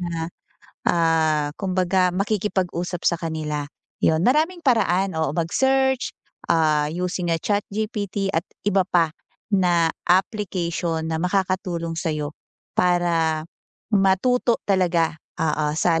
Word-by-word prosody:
na, 165 -2 -3 0.6
ah, 160 -3 +2
kumbaga 185 -1 +2
makikipag-usap 185 -3 -1
sa 170 - +3
kanila, 150 -3 -3 0.3
'yun. 160 +3 +2
Maraming 320 +7 +2
paraan, 195 - +2
oo 160 -1 0
mag-search, 265 +9 +1 0.4
ah, 155 -2 +3
using 180 +2 -2
a 165 - +2
ChatGPT 205 -1 -2
at 165 +1 0 0.2
iba 195 -2 +3
pa 165 -4 +2 0.4
na 175 -4 +3 0.2
application 175 -4 0
na 160 0 -1
makakatulong 180 -2 -1
sa'yo, 150 -3 -2 0.4
para 170 -3 +1 0.5
matuto 210 +5 +3
talaga 175 -5 +2 0.2
oo 155 -1 0
sa 165 0 +2
175 Hz, 105 wpm, -23 LUFS, 165-195 Hz, 0.6 s, sa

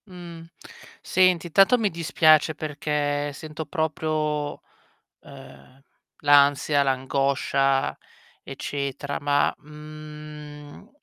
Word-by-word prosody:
Mhmm. 170 -3 -11 0.5
Senti, 185 -2 +2
intanto 195 +8 +5
mi 220 -3 +1
dispiace 155 -1 +3
perché 145 -1 -2
sento 155 +2 -7
proprio, 155 -1 -2 0.6
ehm, 135 -1 -15 0.4
l'ansia, 145 0 +4
l'angoscia 135 0 0 0.5
eccetera. 140 0 -5
Ma, 145 0 +1
mhmm 150 -1 -11
150 Hz, 75 wpm, -24 LUFS, 140-155 Hz, 0.6 s, intanto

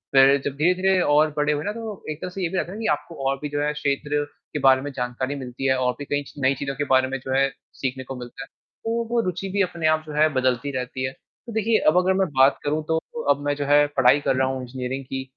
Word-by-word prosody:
फिर 135 +1 +7
जब 140 - -2
धीरे-धीरे 185 +4 +3
और 150 -1 +3
बड़े 150 0 +2
हुए 150 +1 -2
ना 205 - -1
तो 220 -3 -7
एक 150 - -7
तरह - - -4
से 190 +1 -6
ये 170 - 0
भी 190 - -3
रहता 175 - -2
है 205 - -7
कि 225 - -4
आपको 165 +3 -3
और 135 - 0
भी 150 - -3
जो 145 0 -2
है 150 0 +1
क्षेत्र 145 0 -1 0.3
के 150 - -1
बारे 130 -1 +5
में 145 +1 -5
जानकारी 125 +3 -3
मिलती 130 0 -6
है 130 - +4
और 125 -1 +1
भी 145 - -5
कई 145 +1 -1
च - - -14
नई 135 +1 +4
चीज़ों 135 +1 -4
के 145 - -1
बारे 130 -1 +3
में 135 +1 -3
जो 130 - -7
है 135 +1 +3 0.3
सीखने 130 0 -2
को 135 - -7
मिलता 125 -1 -8
है। - - -12 0.4
तो 230 +1 0
वो 240 - +2
रुचि 185 +2 -3
भी 200 +1 0
अपने 170 -3 0
आप 155 0 +2
जो 150 - -8
है 155 +1 +4
बदलती 130 +1 0
रहती 130 0 -4
है, 130 - -2
तो 230 - -15
देखिए 220 0 +2
अब 155 +4 +5
अगर 185 +1 +3
मैं 190 -1 +1
बात 135 +1 +6
करूँ 150 +2 -1
तो 160 0 +1 0.3
अब 145 0 +4
मैं 145 0 +1
जो 145 - -3
है 145 +1 +5
पढ़ाई 130 +3 +6
कर 135 - +1
रहा 130 0 +2
हूँ 130 -1 -3
इंजीनियरिंग 130 +1 -5
की 130 0 -4
145 Hz, 280 wpm, -24 LUFS, 130-165 Hz, 0.4 s, फिर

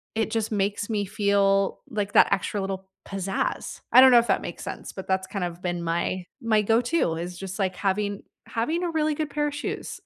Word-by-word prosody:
it 220 0 0
just 225 -1 -1
makes 205 0 -1
me 205 -2 0
feel 200 -1 +2
like 205 -4 -3
that - - +6
extra 200 +1 0
little 190 0 -4 0.2
pizzazz. 195 0 -3
I - - +8
don't 260 0 +9
know 240 - +8
if 235 - -1
that 195 - +1
makes 175 - -6
sense, - - -6
but 190 - -8
that's 190 0 0
kind 190 -1 -3
of 175 0 -5
been 175 -1 -2
my 170 +2 -1
my 220 -2 +2
go-to 230 - +2
is 175 +2 -5
just 190 +1 -6
like 190 -3 0
having 200 +1 -1 0.2
having 310 +10 -1
a 345 - -1
really 310 -1 +1
good 305 -1 -3
pair 295 0 0
of 290 - -4
shoes. - - -5
200 Hz, 215 wpm, -25 LUFS, 190-230 Hz, 0.2 s, don't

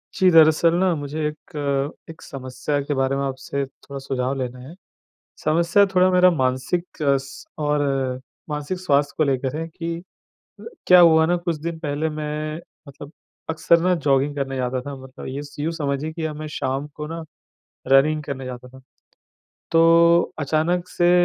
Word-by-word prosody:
जी, 185 - +4
दरअसल 165 +1 +5
ना, 185 -1 +3
मुझे 150 +1 -4
एक 145 -1 -3 0.2
एक 160 - -11
समस्या 130 +2 -4
के 145 +1 -3
बारे 135 0 +1
में 140 - -1
आपसे 135 +1 -3
थोड़ा 140 +1 -11
सुझाव 135 -1 -2
लेना 125 -1 -4
है। 155 - -10 0.7
समस्या 170 +6 +4
थोड़ा 185 0 +5
मेरा 180 0 +6
मानसिक 130 +5 -2
अ, 140 -2 +3
स 135 - -10
और 140 -3 0 0.3
मानसिक 150 +4 -3
स्वास्थ्य 145 -5 +1
को 155 - +3
लेकर 135 -1 -1
है 165 +1 -4
कि 165 0 -5 0.6
अ, - - -12 0.2
क्या 180 0 +8
हुआ 160 -2 +6
ना, 175 +2 +1
कुछ 170 -1 -2
दिन 165 0 -4
पहले 150 0 -2
मैं 155 0 -4 0.3
मतलब 140 +1 -11 0.4
अक्सर 165 +1 +3
ना, 180 +1 +3
जॉगिंग 145 -2 +1
करने 135 -1 -3
जाता 125 0 -1
था। 140 +2 -7
मतलब 130 +1 -10
ये 135 +2 -4
स 145 - -13
यूँ 155 +3 -1
समझिए 145 -1 -2
कि 160 -1 -4
अब 155 -1 -3
मैं 155 - -5
शाम 135 +2 -2
को 150 0 -6
ना, 165 +1 -6 0.6
रनिंग 150 +3 +4
करने 135 -2 -5
जाता 125 0 -8
था। 130 +1 -15 0.9
तो 170 +1 +5
अचानक 160 +4 0
से 175 -1 +2
150 Hz, 170 wpm, -22 LUFS, 135-165 Hz, 0.9 s, क्या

